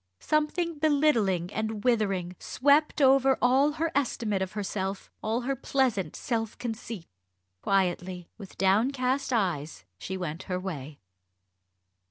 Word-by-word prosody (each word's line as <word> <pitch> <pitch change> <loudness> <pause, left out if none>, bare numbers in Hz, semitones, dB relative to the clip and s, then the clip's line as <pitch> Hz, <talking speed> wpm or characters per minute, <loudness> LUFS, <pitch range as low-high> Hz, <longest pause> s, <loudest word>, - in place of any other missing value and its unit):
Something 310 +1 0
belittling 235 - +2
and 220 -1 -3
withering 195 -7 +1
swept 290 +2 +2
over 270 0 +5
all 270 +4 +4
her 320 +2 -1
estimate 230 -7 0
of 190 -1 -3
herself, 195 -1 -3
all 225 +3 -1
her 270 +3 -1
pleasant 255 -7 0
self 225 -2 -2
conceit. 225 -5 -5 0.6
Quietly, 180 -2 0
with 200 -4 -12
downcast 255 +8 +1
eyes, 160 - -1
she 190 - -4
went 170 -1 -4
her 180 0 -1
way. 155 -6 -6
220 Hz, 120 wpm, -28 LUFS, 190-270 Hz, 0.6 s, over